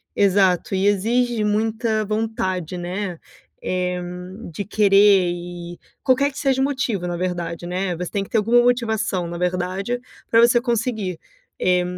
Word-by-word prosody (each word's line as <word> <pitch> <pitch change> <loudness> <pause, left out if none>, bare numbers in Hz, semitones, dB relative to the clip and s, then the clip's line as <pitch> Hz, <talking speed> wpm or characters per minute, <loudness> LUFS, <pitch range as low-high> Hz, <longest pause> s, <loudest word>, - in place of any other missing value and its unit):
exato, 195 -2 +3
e 190 +1 +1
exige 230 +3 +1
muita 220 +1 0
vontade, 190 -5 -2
né, 180 0 -4 0.5
eh, 180 0 -1 0.5
de 200 - -3
querer 200 -3 +5
e 175 0 -8 0.2
qualquer 275 +2 +3
que - - -14
seja 270 -2 +1
o 270 - +3
motivo, 255 -10 -1
na 175 -1 -3
verdade, 175 -2 -3
né, 180 0 -2
você 180 0 -5
tem 200 -2 -1
que - - -12
ter 225 - +1
alguma 235 +3 +4
motivação, 220 -7 0
na 170 0 -5
verdade, 185 +6 -1 0.3
para 230 - +5
você 240 0 +5
conseguir. 225 -7 -2 0.4
Eh 180 -1 +2
200 Hz, 150 wpm, -22 LUFS, 180-230 Hz, 0.5 s, querer